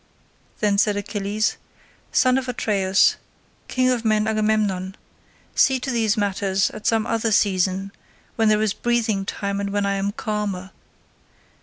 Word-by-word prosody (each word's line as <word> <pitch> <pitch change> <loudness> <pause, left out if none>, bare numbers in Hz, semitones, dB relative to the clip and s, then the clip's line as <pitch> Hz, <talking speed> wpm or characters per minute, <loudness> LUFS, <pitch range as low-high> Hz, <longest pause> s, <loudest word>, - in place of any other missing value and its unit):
Then 205 -2 +2
said 210 -1 +2
Achilles, 205 +1 -2 0.5
"Son 255 0 +3
of 260 -1 -6
Atreus, 195 -5 +2 0.5
king 255 0 +1
of 240 -2 -1
men 215 -1 +2
Agamemnon, 210 -3 0 0.6
see 265 -2 +3
to 265 +1 -3
these 225 -2 +1
matters 195 -1 0
at 215 - -6
some 225 -1 +2
other 225 -1 0
season, 195 -1 +1 0.4
when 225 -1 +2
there 215 0 +3
is 210 -2 +1
breathing 225 -5 0
time 200 0 -3
and 200 0 -2
when 205 0 0
I 200 - +1
am 195 +1 -1
calmer. 205 -3 -4
210 Hz, 145 wpm, -22 LUFS, 200-225 Hz, 0.6 s, Son